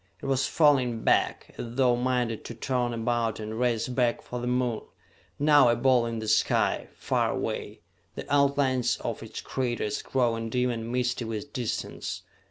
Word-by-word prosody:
It -, -, -9 dB
was 135 Hz, -1 st, +1 dB
falling 130 Hz, -7 st, +3 dB
back, -, -, +1 dB
as 120 Hz, 0 st, -6 dB
though 125 Hz, -2 st, +4 dB
minded 125 Hz, -2 st, -1 dB
to 120 Hz, -, -7 dB
turn 125 Hz, 0 st, -1 dB
about 115 Hz, -1 st, -1 dB
and 110 Hz, +1 st, -5 dB
race 120 Hz, -2 st, +1 dB
back 125 Hz, -2 st, 0 dB
for 125 Hz, -, -5 dB
the 120 Hz, -, -3 dB
Moon, 125 Hz, -2 st, 0 dB, 0.6 s
now 145 Hz, -3 st, +5 dB
a 120 Hz, -, +3 dB
ball 120 Hz, -1 st, +3 dB
in 115 Hz, 0 st, -3 dB
the 110 Hz, 0 st, -5 dB
sky, 105 Hz, 0 st, +2 dB
far -, -, 0 dB
away, -, -, -4 dB, 0.3 s
the -, -, -6 dB
outlines 140 Hz, -3 st, +2 dB
of -, -, -4 dB
its -, -, -7 dB
craters 120 Hz, -5 st, -2 dB
growing 115 Hz, -3 st, 0 dB
dim 125 Hz, +1 st, +1 dB
and 115 Hz, 0 st, -4 dB
misty 125 Hz, 0 st, 0 dB
with 110 Hz, +5 st, -5 dB
distance. 125 Hz, -5 st, -4 dB
120 Hz, 170 wpm, -27 LUFS, 115-130 Hz, 0.6 s, now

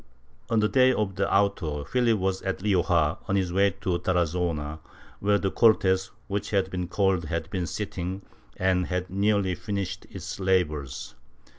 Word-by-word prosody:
On 115 Hz, -, +3 dB
the 105 Hz, -, +3 dB
day 130 Hz, +2 st, +5 dB
of 105 Hz, -5 st, -1 dB
the 100 Hz, 0 st, 0 dB
auto 95 Hz, -7 st, +1 dB
Philip 115 Hz, -, +2 dB
was 95 Hz, -1 st, -1 dB
at 95 Hz, -1 st, -3 dB
Rioja, 85 Hz, -6 st, +2 dB
on 100 Hz, -, +1 dB
his 95 Hz, -3 st, 0 dB
way 100 Hz, +1 st, +4 dB
to 90 Hz, -4 st, 0 dB
Tara 90 Hz, -1 st, +2 dB
zona, 80 Hz, -3 st, -2 dB, 0.4 s
where 100 Hz, 0 st, +3 dB
the 95 Hz, -1 st, -1 dB
Cortes 95 Hz, -4 st, +3 dB, 0.2 s
wdiich 100 Hz, +1 st, -2 dB
had 95 Hz, -2 st, 0 dB
been 90 Hz, -1 st, -3 dB
called 95 Hz, -2 st, +1 dB
had 80 Hz, 0 st, -3 dB
been 90 Hz, -3 st, -2 dB
sitting 95 Hz, -1 st, -4 dB, 0.3 s
and 95 Hz, -2 st, +1 dB
had 90 Hz, 0 st, -3 dB
nearly 100 Hz, -1 st, +2 dB
finished 100 Hz, 0 st, -4 dB
its -, -, -7 dB
labors. 75 Hz, -8 st, -1 dB
95 Hz, 165 wpm, -26 LUFS, 90-100 Hz, 0.4 s, day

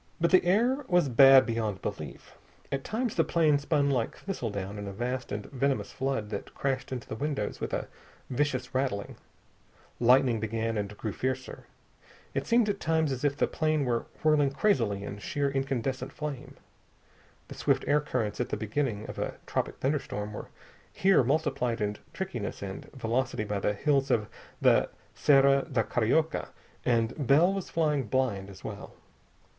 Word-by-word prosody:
But 170 Hz, 0 st, +2 dB
the 185 Hz, -, +6 dB
air 235 Hz, +10 st, +2 dB
was 175 Hz, -6 st, +3 dB
bad 135 Hz, +1 st, +8 dB
beyond 110 Hz, -4 st, -2 dB
belief. -, -, -6 dB, 0.4 s
At 135 Hz, -1 st, -2 dB
times 235 Hz, +1 st, -2 dB
the 165 Hz, -, +3 dB
plane 155 Hz, -4 st, +3 dB
spun 145 Hz, -1 st, +1 dB
like 120 Hz, -3 st, -1 dB
thistledown 105 Hz, -, -4 dB
in 100 Hz, -, -5 dB
a -, -, -4 dB
vast 125 Hz, +5 st, -3 dB
and 105 Hz, 0 st, -3 dB
venomous 135 Hz, 0 st, 0 dB
flood 130 Hz, -6 st, -2 dB
that 100 Hz, -, -6 dB
crashed 135 Hz, -1 st, -2 dB
into 125 Hz, -3 st, -5 dB
the -, -, -6 dB
windows 135 Hz, -3 st, -3 dB
with -, -, -3 dB
a -, -, -2 dB, 0.4 s
vicious 130 Hz, -1 st, -1 dB
rattling. 130 Hz, -6 st, -1 dB, 0.8 s
Lightning 125 Hz, -1 st, +4 dB
began 115 Hz, +1 st, -2 dB
and 105 Hz, 0 st, -3 dB
grew 110 Hz, -3 st, -4 dB
fiercer. 130 Hz, 0 st, -3 dB, 0.7 s
It -, -, -2 dB
seemed 235 Hz, -2 st, +4 dB
at 200 Hz, -1 st, -1 dB
times 160 Hz, -2 st, +1 dB
as 130 Hz, 0 st, -4 dB
if 145 Hz, -1 st, +1 dB
the -, -, +3 dB
plane 155 Hz, -2 st, 0 dB
were 120 Hz, -2 st, -1 dB, 0.2 s
whirling 150 Hz, -2 st, +4 dB
crazily 120 Hz, -, +1 dB
in 100 Hz, 0 st, -6 dB
sheer 140 Hz, +6 st, -1 dB
incandescent 135 Hz, -1 st, -2 dB
flame. 140 Hz, -2 st, -6 dB, 0.9 s
The -, -, -8 dB
swift -, -, +1 dB
air 150 Hz, +1 st, +4 dB
currents 110 Hz, -7 st, -2 dB
at 125 Hz, -, -2 dB
the -, -, -2 dB
beginning 110 Hz, -1 st, -2 dB
of -, -, -7 dB
a -, -, -3 dB
tropic -, -, -2 dB
thunderstorm 115 Hz, -7 st, -2 dB
were -, -, -7 dB, 0.4 s
here 190 Hz, -7 st, +4 dB
multiplied 135 Hz, -4 st, 0 dB
in 105 Hz, -1 st, -1 dB
trickiness 125 Hz, -, -4 dB
and 95 Hz, -1 st, -6 dB
velocity 125 Hz, -1 st, -1 dB
by 105 Hz, -1 st, -2 dB
the 105 Hz, -, +1 dB
hills 140 Hz, +3 st, +1 dB
of 105 Hz, -2 st, +2 dB, 0.3 s
the -, -, +4 dB, 0.2 s
Serra 140 Hz, -1 st, +4 dB
da 120 Hz, -4 st, +2 dB
Carioca, 140 Hz, +10 st, +1 dB, 0.4 s
and 120 Hz, +3 st, 0 dB
Bell 165 Hz, +8 st, +5 dB
was 195 Hz, -2 st, -4 dB
flying 150 Hz, -5 st, +1 dB
blind 105 Hz, -6 st, 0 dB
as 95 Hz, -, -13 dB
well. -, -, -7 dB
130 Hz, 165 wpm, -29 LUFS, 115-145 Hz, 0.9 s, bad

